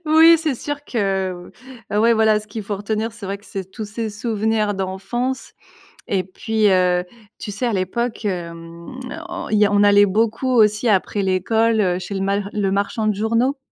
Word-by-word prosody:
Oui, 320 +2 +7
c'est 310 -3 -1
sûr 290 +3 -5
que 190 -5 -2 0.4
ouais, 220 +3 +3
voilà, 220 -1 +3
ce 215 - -14
qu'il 220 -1 -6
faut 200 0 -4
retenir, 215 +2 -2
c'est 210 -3 -9
vrai 200 +1 -4
que 205 - -23
c'est 190 -2 -6
tous 215 +2 -6
ces 220 +2 -4
souvenirs 215 -1 -1
d'enfance 195 +8 -3 0.6
et 190 -2 0
puis, 215 +3 0
heu, 180 -1 +2 0.3
tu 205 - -5
sais, 205 +5 -3
à 235 - +1
l'époque, 220 +5 -2
hem, 170 +1 -6 0.3
on 345 -1 -5
il 215 - +2
y 210 - +5
a 200 - +1
on 205 0 +4
allait 205 0 +6
beaucoup 225 +5 0
aussi, 215 -1 +3
après 200 0 +1
l'école, 220 +4 +1
heu, 180 -2 +1
chez 185 +2 -6
le 195 - -2
mal 200 +1 -1
le 200 -2 0
marchand 205 +2 -1
de 210 - +1
journaux 230 +6 +1
210 Hz, 195 wpm, -20 LUFS, 195-230 Hz, 0.6 s, Oui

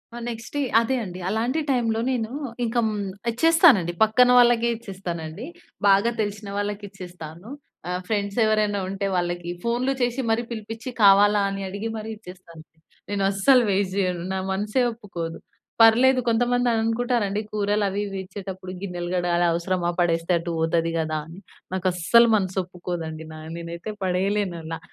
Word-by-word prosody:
ఆ! - - -6
Next 230 -1 -8
day - - +1 0.2
అదే 260 +3 0
అండి. 185 -2 -7
అలాంటి 235 +8 0
టైంలో 230 -3 +1
నేను 230 -3 -2 0.3
ఇంక 230 +1 -4
హ్మ్, 210 -1 -2 0.3
ఇచ్చేస్తానండి. 275 - +5
పక్కన 235 +3 +4
వాళ్ళకే 240 -1 +5
ఇచ్చేస్తానండి. 185 -3 -6 0.4
బాగా 200 +4 +4
తెలిసిన 205 0 -4
వాళ్ళకిచ్చేస్తాను. 195 -3 -6 0.4
ఆహ్, 180 0 -2
ఫ్రెండ్స్ 200 -1 -2
ఎవరైనా 215 -1 +1
ఉంటే 195 +1 -3
వాళ్ళకి 175 -1 -2
ఫోన్లు 240 +3 0
చేసి 245 +2 0
మరి 225 +1 +2
పిలిపించి 225 +2 -6
కావాలా 205 +1 +6
అని 195 0 -4
అడిగి 200 +4 -4
మరి 215 0 -6
ఇచ్చేస్తానంది. 175 -5 -14 0.3
నేనస్సలు 200 +5 +3
వేస్ట్ 190 -1 0
చేయను. 180 -3 0
నా 190 - -1
మనసే 210 +6 0
ఒప్పుకోదు. 175 -8 -6 0.4
పర్లేదు, 250 +4 +6
కొంతమంది 245 +2 +2
అనుకుంటారండి. 225 -2 0
కూరలవి, 205 -1 0
ఇవి 195 -1 -6
ఇచ్చేటప్పుడు 190 -1 -8
గిన్నెలు 175 -3 -4
కడగాలి, 175 -1 +1
అవసరమా, 175 +1 -1
పడేస్తే 165 0 +1
అటు 170 +1 -4
పోతది 165 +1 +1
కదా 155 -1 -1
అని. 165 +4 -11 0.3
నాకస్సలు 185 +5 +4
మనస్సు 190 -2 -1
ఒప్పుకోదండి. 175 -3 -6
నా 155 - -9 0.2
నేనైతే 170 +4 -6
పడేయలేనలా. 180 -3 -1
200 Hz, 135 wpm, -24 LUFS, 175-225 Hz, 0.4 s, కావాలా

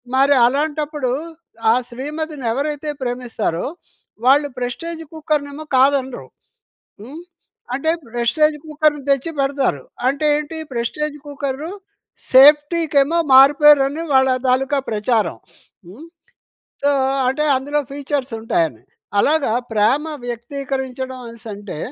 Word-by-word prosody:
మరి 275 +2 +5
అలాంటప్పుడు 295 0 -1 0.6
ఆ - - +5 0.2
శ్రీమతిని 295 +2 -5
ఎవరైతే 295 +4 -3
ప్రేమిస్తారో 245 -8 -3 0.6
వాళ్ళు 285 +3 +5
ప్రెస్టీజ్ 325 +7 -5
కుక్కర్నేమో 300 -1 -3
కాదనరు. 265 -1 +1 0.7
హ్మ్. 280 +10 -9 0.5
అంటే 295 +5 0 0.2
ప్రెస్టీజ్ 300 +6 +2
కుక్కర్‌ని 305 -2 0
తెచ్చి 275 +4 +1
పెడతారు. 270 - 0 0.2
అంటే 280 +3 0
ఏంటి 300 +2 -5 0.2
ప్రెస్టీజ్ 295 +6 -3
కుక్కరు 285 +3 -4 0.6
సేఫ్టీకేమో 295 +2 +5 0.2
మారు 270 +2 +8
పేరని 295 0 +5
వాళ్ళ 265 0 +5 0.2
తాలుకా 265 +3 +2
ప్రచారం. 215 +1 0 0.5
హ్మ్. 230 - -12 0.8
సో, 285 - +2 0.4
అంటే 270 +4 0
అందులో 285 +3 -1
ఫీచర్స్ 275 -3 -3
ఉంటాయని 165 - -1 0.4
అలాగా 295 -1 +2 0.2
ప్రేమ 220 +8 +2 0.2
వ్యక్తీకరించడం 260 +1 -5
అనేసంటే, 215 -6 -9
275 Hz, 100 wpm, -19 LUFS, 250-295 Hz, 0.8 s, మారు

